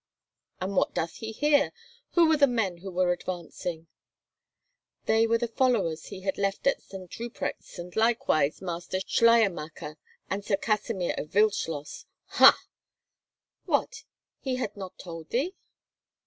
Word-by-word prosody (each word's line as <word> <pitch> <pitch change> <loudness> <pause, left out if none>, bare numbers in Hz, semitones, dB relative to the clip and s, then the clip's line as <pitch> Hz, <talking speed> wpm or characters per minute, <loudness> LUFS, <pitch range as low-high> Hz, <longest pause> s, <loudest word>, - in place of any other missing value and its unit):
"And 190 +2 -3
what - - +1
doth 165 0 -2
he 220 0 -5
here? 290 +4 +3 0.4
Who 340 -2 +6
were 315 -1 +4
the 285 -1 +6
men 220 -8 0
who 190 +3 -8
were 180 0 +2
advancing?" 175 -2 -5 1.2
"They 225 +1 +3
were 230 0 +3
the 240 +1 -1
followers 220 -10 +1
he 195 -2 -8
had 190 +1 -2
left 195 0 -1
at 275 - +2
St. 190 -2 -10
Ruprecht's, 235 0 -5
and 175 0 -8
likewise 220 - +2
Master 175 +1 -3
Schleiermacher 175 -10 +2 0.3
and 200 +1 -3
Sir 200 -1 +1
Kasimir 210 -3 -1
of 150 - -6
Wildschloss." 180 -8 0 0.3
"Ha!" - - +8 1.0
"What—he 265 -2 -3
had 245 -5 -3
not 190 -2 -8
told 165 -3 -9
thee?" 290 +10 0
195 Hz, 135 wpm, -28 LUFS, 175-230 Hz, 1.2 s, Ha